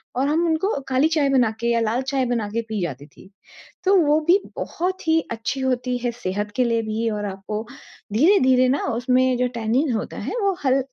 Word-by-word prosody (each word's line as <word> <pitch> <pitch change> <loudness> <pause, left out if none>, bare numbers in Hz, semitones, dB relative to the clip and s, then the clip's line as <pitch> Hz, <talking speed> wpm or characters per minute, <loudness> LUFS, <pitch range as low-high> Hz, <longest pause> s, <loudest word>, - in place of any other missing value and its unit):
और 270 +2 +1
हम 320 +3 +1
उनको 325 +2 0
काली 265 +3 +3
चाय 300 -3 +2
बना 250 -5 +3
के 235 - -1
या 235 - +2
लाल 225 +3 0
चाय 265 -1 0
बना 235 -3 -1
के 230 +2 -2
पी 215 -3 -2
जाती 145 -4 -4
थी। 160 - -18 0.6
तो 390 +1 +5
वो 305 -3 +4
भी 370 +3 +6 0.2
बहुत 365 0 -3
ही 320 0 +4
अच्छी 235 +4 -3
होती 250 -1 0
है 240 0 -1
सेहत 205 -2 -4
के 255 - +3
लिए 230 -1 +1
भी 220 +1 -1
और 210 -1 -3
आपको 200 +2 -5 0.5
धीरे-धीरे 260 - +4
न 275 - +2
उसमें 255 +1 +2
जो 250 - +1
टैनिन 235 +6 0
होता 215 - -4
है - - -4
वो 395 -1 +2
हल 265 +1 +4
250 Hz, 210 wpm, -22 LUFS, 225-285 Hz, 0.6 s, भी